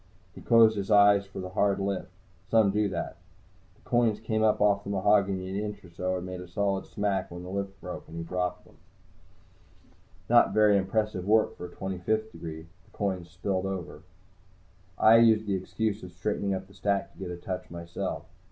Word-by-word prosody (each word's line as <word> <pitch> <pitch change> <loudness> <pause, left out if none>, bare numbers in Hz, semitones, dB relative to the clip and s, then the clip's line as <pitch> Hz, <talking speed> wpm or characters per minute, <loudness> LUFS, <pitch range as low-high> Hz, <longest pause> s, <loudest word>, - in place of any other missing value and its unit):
He - - -11
closed 115 -2 +5
his 100 -1 -3
eyes 100 -1 +5
for 100 - -8
the 90 -1 -5
hard 100 +1 +1
lift. 100 -1 -2 0.4
Some 110 -3 +4
do 105 0 +1
that. 85 -3 -4 0.6
The - - -26
coins 115 -3 +2
came 110 0 -1
up 110 -1 +3
off 100 -1 +3
the 100 - -7
mahogany 100 -1 +2
an 95 - -5
inch 105 -1 -5
or 85 - -15
so, 90 +2 -2
and 90 - -6
made 90 -1 -6
a 90 - -9
solid 95 +2 -1
smack 100 -2 -1
when 85 0 -8
the 90 - -8
lift 100 0 -4
broke 90 - -7
and 80 - -9
he 85 - -3
dropped 90 +2 -3
them - - -20
back. - - -31 0.5
Not - - -7
very 105 -1 +5
impressive 100 -1 0
work 110 +1 +3
for 90 - -7
a 85 - -16
Twenty 95 -1 -4
fifth 110 +4 -1
degree. 80 -1 -8 0.2
The - - -24
coins 95 -4 -2
spilled 95 +1 -2
over. 95 -4 -5 1.0
I 110 +1 +7
used 110 -2 +5
the 100 - -1
excuse 105 +3 -2
of 90 - -9
straightening 100 +1 -1
up 95 0 -5
the 100 - -19
stack 100 -1 -1
to - - -20
get 95 -2 -5
a 90 - -5
touch, 90 +1 -5
myself. 85 +3 -5
100 Hz, 205 wpm, -28 LUFS, 90-105 Hz, 1.0 s, I